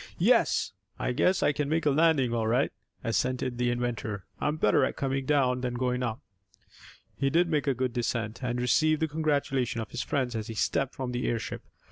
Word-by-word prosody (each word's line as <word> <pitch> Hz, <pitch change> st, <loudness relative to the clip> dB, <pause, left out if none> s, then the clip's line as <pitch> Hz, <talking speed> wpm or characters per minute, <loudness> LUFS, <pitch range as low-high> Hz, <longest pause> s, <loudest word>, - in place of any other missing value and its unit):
"Yes. -, -, +3 dB, 0.3 s
I -, -, -1 dB
guess 180 Hz, +9 st, +2 dB
I 145 Hz, -, +4 dB
can 145 Hz, -1 st, -2 dB
make 160 Hz, +1 st, 0 dB
a 145 Hz, -, +4 dB
landing 145 Hz, -5 st, +3 dB
all 115 Hz, -2 st, 0 dB
right," 125 Hz, +5 st, +2 dB, 0.3 s
assented 125 Hz, +1 st, -1 dB
the 125 Hz, 0 st, +2 dB
inventor. 120 Hz, -4 st, -3 dB
"I'm 150 Hz, +1 st, 0 dB
better 145 Hz, -, +3 dB
at -, -, 0 dB
coming 135 Hz, -1 st, -2 dB
down 130 Hz, -4 st, +2 dB
than 125 Hz, -1 st, -2 dB
going 125 Hz, 0 st, 0 dB
up." 115 Hz, -3 st, -2 dB, 0.9 s
He 135 Hz, -, +1 dB
did 170 Hz, +4 st, +3 dB
make 150 Hz, -3 st, 0 dB
a 135 Hz, -, +2 dB
good 130 Hz, -1 st, -1 dB
descent, 115 Hz, -1 st, -2 dB
and 120 Hz, 0 st, -1 dB
received 155 Hz, +5 st, +3 dB
the -, -, +2 dB
congratulation 140 Hz, -6 st, 0 dB
of 110 Hz, -, -5 dB
his 125 Hz, -, -3 dB
friends 130 Hz, -5 st, -1 dB
as 110 Hz, -1 st, -3 dB
he 115 Hz, -, -6 dB
stepped 135 Hz, +5 st, 0 dB
from 130 Hz, -2 st, -3 dB
the 125 Hz, 0 st, -2 dB
airship. 115 Hz, -2 st, -3 dB
130 Hz, 200 wpm, -28 LUFS, 120-145 Hz, 0.9 s, I